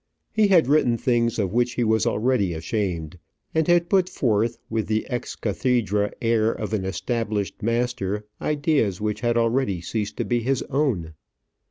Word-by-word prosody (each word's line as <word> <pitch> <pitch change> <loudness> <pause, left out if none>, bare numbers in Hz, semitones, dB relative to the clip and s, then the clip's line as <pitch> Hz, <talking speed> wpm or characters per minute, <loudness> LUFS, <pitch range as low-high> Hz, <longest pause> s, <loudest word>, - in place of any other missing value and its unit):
He 215 -1 +4
had 175 -8 +5
written 135 -5 +3
things 120 -2 +1
of 100 -3 -1
which 120 +1 +1
he 120 - 0
was 110 -1 +2
already 105 -6 +1
ashamed, 85 -2 -3 0.3
and 160 -1 +1
had 175 -1 +4
put 185 -2 +2
forth 115 - 0
with 110 -1 -2
the 110 0 -1
ex 120 -1 -3
cathedra 105 -2 0
air 115 -1 +3
of 110 -1 -5
an 100 -3 -1
established 105 +1 -2
master 115 -3 -1 0.2
ideas 145 - +1
which 105 0 -2
had 120 -1 +1
already 115 -4 +1
ceased 105 +5 -4
to - - -1
be 120 -1 +1
his 130 +2 0
own. 120 - 0
115 Hz, 165 wpm, -24 LUFS, 105-125 Hz, 0.3 s, had